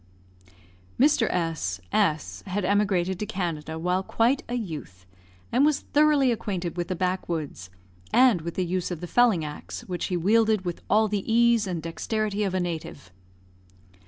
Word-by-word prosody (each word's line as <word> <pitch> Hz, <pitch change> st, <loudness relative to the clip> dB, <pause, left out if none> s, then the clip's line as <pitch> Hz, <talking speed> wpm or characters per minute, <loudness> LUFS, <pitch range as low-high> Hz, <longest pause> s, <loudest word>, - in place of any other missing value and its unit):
Mr. 275 Hz, -4 st, +4 dB
S 160 Hz, -, -2 dB
S 155 Hz, -1 st, 0 dB
had 190 Hz, +1 st, -2 dB
emigrated 190 Hz, -2 st, +1 dB
to 210 Hz, -, -3 dB
Canada 160 Hz, -4 st, -3 dB
while 180 Hz, +3 st, 0 dB
quite 230 Hz, +7 st, +1 dB
a 245 Hz, -, -2 dB
youth, 150 Hz, -, -6 dB, 0.5 s
and 255 Hz, -, +3 dB
was 300 Hz, -1 st, +3 dB
thoroughly 295 Hz, -3 st, +3 dB
acquainted 185 Hz, -7 st, -3 dB
with 175 Hz, -1 st, -2 dB
the 185 Hz, -, -2 dB
backwoods, 170 Hz, -, -3 dB, 0.4 s
and 245 Hz, -9 st, +5 dB
with 170 Hz, +1 st, -6 dB
the 185 Hz, -, 0 dB
use 180 Hz, 0 st, -2 dB
of 175 Hz, -3 st, -4 dB
the 175 Hz, -, -5 dB
felling 210 Hz, -5 st, +3 dB
axe, 150 Hz, 0 st, -7 dB
which 180 Hz, -2 st, -4 dB
he 180 Hz, -, -1 dB
wielded 215 Hz, +2 st, +2 dB
with 175 Hz, -1 st, -4 dB
all 220 Hz, +1 st, +4 dB
the 210 Hz, +1 st, -2 dB
ease 235 Hz, -2 st, +4 dB
and 170 Hz, -4 st, -3 dB
dexterity 210 Hz, +5 st, -2 dB
of 190 Hz, -2 st, -1 dB
a -, -, +1 dB
native. 165 Hz, -, -5 dB
185 Hz, 160 wpm, -26 LUFS, 170-220 Hz, 0.5 s, and